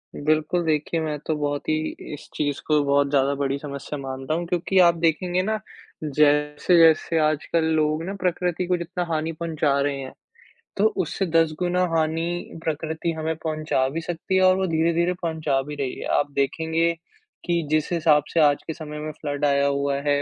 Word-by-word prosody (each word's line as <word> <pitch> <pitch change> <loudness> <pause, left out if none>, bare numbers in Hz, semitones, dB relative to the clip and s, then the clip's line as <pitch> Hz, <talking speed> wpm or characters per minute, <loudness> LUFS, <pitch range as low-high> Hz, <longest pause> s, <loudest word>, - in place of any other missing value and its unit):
बिल्कुल, 155 +3 +1
देखिए, 155 +1 0
मैं 155 -2 -2
तो 155 - +1
बहुत 145 -1 -2
ही 155 - +3 0.4
इस 150 - -10
चीज़ 145 -2 -1
को 150 -1 +3
बहुत 140 0 +2
ज़्यादा 140 0 +2
बड़ी 140 0 -1
समस्या 140 0 -6
मानता 135 +1 -4
हूँ 170 +2 -1
क्योंकि 180 +2 -1
आप 170 -2 +6
देखेंगे 170 +2 +1
ना, 215 +2 -1 0.4
जैसे-जैसे 150 +3 +3
आजकल 155 +2 0
लोग 155 +1 +1
ना 195 - -4
प्रकृति 180 0 0
को 180 0 +2
जितना 175 +1 -3
हानि 160 +1 -1
पहुँचा 155 -3 0
रहे 140 -1 -1
हैं, 130 -1 -7 0.6
तो 200 - +2 0.2
उससे 185 +4 -2
10 165 -2 +2
गुना 180 0 +1
हानि 165 +2 -1
प्रकृति 160 +1 -2
हमें 160 +1 -2
पहुँचा 155 -4 -1
भी 160 +4 -4
सकती 175 +3 -3
है 190 - +4
और 185 0 +6
वो 190 - 0
धीरे-धीरे 170 +2 +1
पहुँचा 160 -5 0
भी 145 +2 -7
रही 135 -3 -3
है। - - -5
आप 145 - 0
देखेंगे 160 +4 +1 0.5
कि 170 -2 +1
जिस 155 +1 +1
हिसाब 155 -3 +4
से 170 - +2
आज 145 -2 +4
के 160 - -2
समय 150 -2 -7
में 155 +1 -4
फ्लड 145 -1 -2
आया 140 0 +3
हुआ 140 0 0
है 145 0 +3
155 Hz, 185 wpm, -24 LUFS, 145-170 Hz, 0.6 s, आप